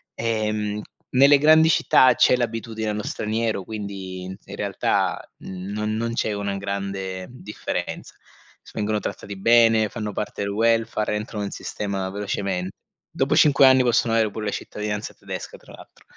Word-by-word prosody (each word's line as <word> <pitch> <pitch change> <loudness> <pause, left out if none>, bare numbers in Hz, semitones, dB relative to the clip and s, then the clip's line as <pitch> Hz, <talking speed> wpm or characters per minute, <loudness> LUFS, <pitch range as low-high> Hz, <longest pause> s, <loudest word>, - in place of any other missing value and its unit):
Ehm, 105 -2 -1 0.3
nelle 140 +3 +6
grandi 155 +2 +6
città 130 -4 +5
c'è - - +5
l'abitudine 115 -2 -3
allo 105 0 -2
straniero, 110 -1 -2
quindi, 100 -3 -6
in 95 +1 -9
realtà - - -1
non 100 +3 -4
non 115 +1 -2
c'è 110 -2 -1
una 100 -1 -3
grande 95 -1 -4
differenza 120 -4 -6 0.5
s - - -17
vengono 105 0 -1
trattati 100 -1 -6
bene, 115 0 +5
fanno 105 -2 -4
parte 105 0 -4
del 100 - -2
welfare, 115 0 +1
entrano 105 0 -4
in 100 - -3
sistema 100 -2 -4
velocemente; 100 -2 -3 0.4
dopo - - 0
5 140 -2 +6
anni 130 0 +7
possono 120 -1 +2
avere 110 -1 +3
pure 105 +1 -6
la 105 - -1
cittadinanza 105 +1 -4
tedesca - - -7
tra - - -17
l'altro. - - -16
105 Hz, 150 wpm, -23 LUFS, 100-115 Hz, 0.5 s, anni